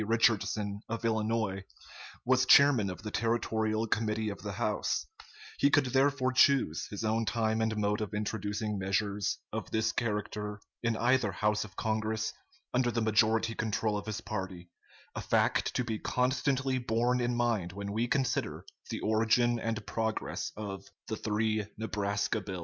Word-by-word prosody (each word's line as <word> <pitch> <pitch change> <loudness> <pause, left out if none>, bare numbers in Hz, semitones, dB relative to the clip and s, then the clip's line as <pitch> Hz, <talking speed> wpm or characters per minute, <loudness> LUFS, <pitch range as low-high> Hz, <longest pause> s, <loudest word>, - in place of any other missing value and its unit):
Richardson, 105 -2 +1
of 115 0 -3
Illinois, 110 -3 0 0.6
was 130 +1 +3
chairman 140 -8 +6
of 90 +3 -7
the 105 - -5
Territorial 110 -1 0
Committee 110 0 0
of 100 - -7
the 105 -1 -5
House, 105 +1 -1 0.5
He 140 - +5
could 145 -1 +4
therefore 135 0 +2
choose 130 - +3
his 105 +1 -5
own 110 +1 +1
time 110 -1 0
and 110 -1 0
mode 105 +1 0
of 105 -1 -3
introducing 105 0 -2
measures 100 +1 0 0.2
of - - -4
this 110 0 +1
character 105 -2 -3 0.2
in 115 -2 0
either 120 -3 +2
house 105 +2 +1
of 100 -3 -12
Congress, 110 0 -1 0.4
under 125 -1 +2
the 115 -1 -1
majority 110 +1 +3
control 110 -1 -1
of 105 - -4
his 110 +1 -3
party 95 -5 -5 0.4
a - - -4
fact - - +2
to 125 - +1
be 110 -2 -3
constantly 130 +1 0
borne 120 +1 +1
in 120 0 0
mind 115 -7 0
when 100 +1 -5
we 115 +3 0
consider 135 -1 -1 0.2
the - - -3
origin 115 +2 +2
and 115 -1 -3
progress 110 -1 -2
of 100 -2 -5 0.3
"the 110 - -1
three 110 0 0
Nebraska 105 0 -1
bills." 95 -2 -5
110 Hz, 155 wpm, -31 LUFS, 105-115 Hz, 0.6 s, chairman